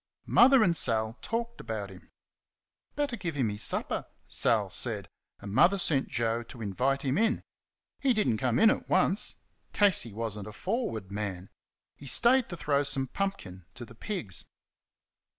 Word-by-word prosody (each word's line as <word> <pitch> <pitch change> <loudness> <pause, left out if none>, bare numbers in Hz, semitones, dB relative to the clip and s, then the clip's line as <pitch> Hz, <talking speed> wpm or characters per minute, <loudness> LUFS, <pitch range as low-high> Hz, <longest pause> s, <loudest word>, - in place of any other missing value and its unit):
Mother 260 -1 +6
and 170 -3 +2
Sal 110 -4 +1
talked 235 +1 -3
about 105 -3 -5
him. 95 - -15 0.9
"Better 290 -4 -1
give 170 -8 -4
him 130 -6 +1
his 105 +1 -5
supper," - - 0 0.2
Sal - - +1
said, - - -2 0.3
and 100 -1 -7
Mother 175 - +5
sent 145 -7 +1
Joe 115 0 -1
to 120 +1 -12
invite 130 +7 0
him 135 +5 0
in. 225 +1 +1 0.6
He 275 - +2
did 215 -3 +1
n't 110 - +1
come 125 -1 +1
in 220 0 +6
at - - -4
once. 185 +2 +2 0.4
Casey 195 - +3
was 110 0 -4
n't 100 - -8
a 105 - -8
forward 115 - -3
man. 100 -2 -5 0.4
He 140 - -12
stayed 240 - +3
to 175 - -6
throw 145 -2 +1
some 135 -2 0
pumpkin 95 - -4
to 120 0 -8
the 115 - -14
pigs. 115 - -5
135 Hz, 170 wpm, -29 LUFS, -, 0.9 s, Mother